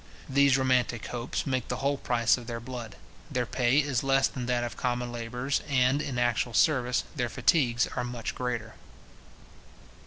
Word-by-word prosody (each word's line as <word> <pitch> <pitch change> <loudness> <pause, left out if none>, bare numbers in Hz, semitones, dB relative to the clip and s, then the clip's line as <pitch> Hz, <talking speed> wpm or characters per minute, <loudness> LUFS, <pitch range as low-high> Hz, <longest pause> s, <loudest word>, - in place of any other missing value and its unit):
These 140 -1 +4
romantic 125 -3 +1
hopes 120 0 -3
make 130 -3 -1
the 125 - -2
whole 140 +2 0
price 120 -3 +2
of 120 -2 -10
their 115 -1 -4
blood. 120 -3 -7 0.3
Their 125 -1 -1
pay 125 +2 +1
is 140 -5 +2
less 135 0 +3
than 125 -2 -6
that 120 -1 +1
of 120 - -4
common 125 -1 -2
labourers, 125 +3 -2
and, 130 +1 +3
in 135 -5 -4
actual 120 -1 0
service, 125 -4 +3
their 120 -4 -1
fatigues 125 -2 +2
are 125 - -1
much 120 -2 -4
greater. 120 -3 -3
125 Hz, 165 wpm, -28 LUFS, 120-130 Hz, 0.3 s, These